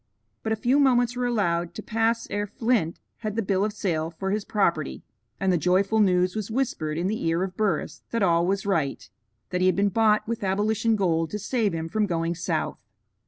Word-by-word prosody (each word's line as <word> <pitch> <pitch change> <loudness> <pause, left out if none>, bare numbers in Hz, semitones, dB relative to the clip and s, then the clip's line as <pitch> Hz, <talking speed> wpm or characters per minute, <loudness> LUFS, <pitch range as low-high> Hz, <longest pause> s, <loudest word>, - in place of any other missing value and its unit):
But 220 - -3
a - - +3
few 245 +6 +2
moments 245 -3 +3
were 245 0 0
allowed 175 -7 0
to 215 - -6
pass 225 +1 0
ere 205 0 -1
Flint 215 -5 0 0.2
had 215 -2 -4
the 225 - 0
bill 195 0 +1
of 210 - 0
sale 170 -6 -1
for 190 +4 -4
his 210 0 -1
property, 170 - 0 0.4
and 190 -1 +2
the 175 - +2
joyful 195 +6 +2
news 180 -2 +3
was 215 -1 -3
whispered 220 - -1
in 170 - -1
the 215 +3 -1
ear 165 +2 +1
of 185 -1 -4
Burris 200 -6 -1
that 230 -3 0
all 170 -1 +3
was 195 +1 0
right; 160 -9 -1 0.4
that 180 0 -1
he 185 - +4
had 185 - +3
been 200 +1 +2
bought 215 +1 +2
with 230 -2 -3
abolition 215 +3 +1
gold 165 -5 +1
to 210 - -3
save 210 -1 0
him 165 0 -3
from 210 +5 0
going 165 -1 -1
south. 175 +1 -2
200 Hz, 215 wpm, -25 LUFS, 175-220 Hz, 0.4 s, he